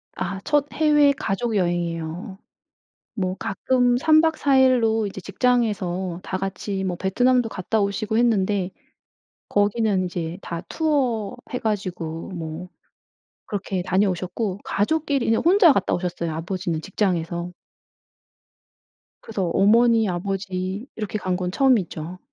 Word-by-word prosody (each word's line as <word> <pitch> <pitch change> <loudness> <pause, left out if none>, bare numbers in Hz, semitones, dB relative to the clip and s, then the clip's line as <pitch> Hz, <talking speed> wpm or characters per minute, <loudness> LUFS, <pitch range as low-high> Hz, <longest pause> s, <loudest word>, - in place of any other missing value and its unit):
아 195 -1 -3
첫 295 -1 +2
해외 295 -2 +4
가족여행이에요. 175 -6 -2 0.8
뭐 185 -3 -2
가끔 245 +4 +1
3 310 +4 +5
박 320 -1 +2
4 275 -2 +2
일로 225 -4 +3
이제 195 -1 -6
직장에서 190 -5 0
다 185 - -3
같이 195 0 -3
뭐 180 -2 -2
베트남도 245 +6 +2
갔다 215 +2 -1
오시고 205 +2 -1
했는데 205 -5 +2 0.8
거기는 205 -2 +1
이제 175 0 -4
다 170 -1 -5
투어 260 -10 0 0.2
해 250 - -1
가지고 180 -6 -3
뭐 165 0 -6 0.8
그렇게 195 -3 -3
다녀오셨고 185 +1 -1
가족끼리는 275 0 +1
혼자 350 -2 +6
갔다 200 - 0
오셨어요, 175 -2 -3
아버지는 170 0 -3
직장에서. 175 -3 -2 1.7
그래서 210 -4 -3
어머니 225 +2 +4
아버지 190 +3 -3
이렇게 215 -1 -3
간 185 -1 -1
건 180 -1 -2
처음이죠. 185 - +1
195 Hz, 265 characters per minute, -23 LUFS, 180-235 Hz, 1.7 s, 혼자